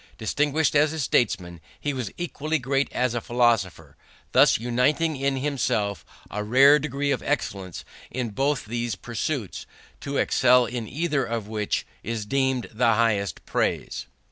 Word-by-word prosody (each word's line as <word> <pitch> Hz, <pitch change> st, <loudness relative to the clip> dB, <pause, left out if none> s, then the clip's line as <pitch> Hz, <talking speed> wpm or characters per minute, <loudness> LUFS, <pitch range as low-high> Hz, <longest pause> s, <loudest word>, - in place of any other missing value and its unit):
Distinguished 145 Hz, +6 st, +1 dB
as 150 Hz, +2 st, +4 dB
a 160 Hz, -, -4 dB
statesman, 90 Hz, -, 0 dB, 0.2 s
he 145 Hz, -, -2 dB
was 125 Hz, -6 st, -3 dB
equally 160 Hz, -2 st, -2 dB
great 135 Hz, 0 st, 0 dB
as 125 Hz, -1 st, 0 dB
a 120 Hz, -, -2 dB
philosopher, 110 Hz, -, 0 dB, 0.4 s
thus -, -, +5 dB
uniting 135 Hz, +7 st, +1 dB
in 135 Hz, 0 st, 0 dB
himself 125 Hz, -7 st, -1 dB, 0.3 s
a 105 Hz, +1 st, -3 dB
rare 135 Hz, +7 st, +6 dB
degree 145 Hz, -1 st, -2 dB
of 130 Hz, -, 0 dB
excellence 95 Hz, -3 st, -3 dB, 0.2 s
in 125 Hz, -3 st, -3 dB
both 135 Hz, +4 st, 0 dB
these 120 Hz, -1 st, -2 dB
pursuits, 120 Hz, -, -4 dB, 0.3 s
to 140 Hz, 0 st, -4 dB
excel 125 Hz, -1 st, +4 dB
in 120 Hz, -1 st, -4 dB
either 150 Hz, -1 st, 0 dB
of 115 Hz, -3 st, -3 dB
which 105 Hz, -1 st, -2 dB, 0.2 s
is 110 Hz, 0 st, -4 dB
deemed 130 Hz, 0 st, 0 dB
the 115 Hz, 0 st, +3 dB
highest 105 Hz, -7 st, 0 dB
praise." -, -, -2 dB
125 Hz, 145 wpm, -25 LUFS, 110-140 Hz, 0.4 s, rare